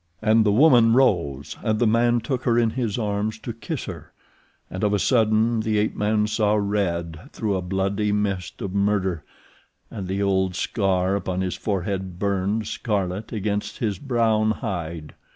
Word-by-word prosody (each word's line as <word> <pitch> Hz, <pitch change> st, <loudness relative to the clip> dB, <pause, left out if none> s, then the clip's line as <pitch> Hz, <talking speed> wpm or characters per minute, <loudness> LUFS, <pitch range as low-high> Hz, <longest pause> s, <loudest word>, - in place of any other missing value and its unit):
And 110 Hz, +1 st, +4 dB
the 105 Hz, -, +3 dB
woman 120 Hz, -2 st, +6 dB
rose, 85 Hz, -, +1 dB
and 110 Hz, -2 st, 0 dB
the 120 Hz, -, +2 dB
man 120 Hz, +2 st, +3 dB
took 125 Hz, +2 st, -2 dB
her 120 Hz, -1 st, +3 dB
in 115 Hz, -2 st, +3 dB
his 115 Hz, -3 st, -2 dB
arms 105 Hz, 0 st, -1 dB
to 115 Hz, +1 st, -6 dB
kiss 135 Hz, +6 st, -5 dB
her, 80 Hz, -5 st, -9 dB, 0.6 s
and 95 Hz, -, -6 dB
of 105 Hz, -1 st, +2 dB
a -, -, +3 dB
sudden 110 Hz, +1 st, +2 dB
the 110 Hz, -1 st, 0 dB
ape 105 Hz, +1 st, 0 dB
man 105 Hz, 0 st, +1 dB
saw 105 Hz, -1 st, +1 dB
red 85 Hz, -6 st, -2 dB
through 105 Hz, -3 st, -2 dB
a 95 Hz, -, -1 dB
bloody 100 Hz, +3 st, -1 dB
mist 100 Hz, -4 st, -2 dB
of 95 Hz, -, -4 dB
murder, 100 Hz, -5 st, 0 dB, 0.7 s
and 100 Hz, -5 st, -6 dB
the 95 Hz, +1 st, -2 dB
old 95 Hz, -2 st, +1 dB
scar 95 Hz, -1 st, 0 dB
upon 95 Hz, -2 st, -2 dB
his 95 Hz, -1 st, -1 dB
forehead 95 Hz, -2 st, -3 dB
burned 100 Hz, +2 st, -1 dB
scarlet 100 Hz, -2 st, -2 dB
against 105 Hz, -1 st, -2 dB
his 105 Hz, -4 st, -2 dB
brown 115 Hz, -5 st, +1 dB
hide. 85 Hz, -, -4 dB
105 Hz, 170 wpm, -23 LUFS, 95-110 Hz, 0.7 s, woman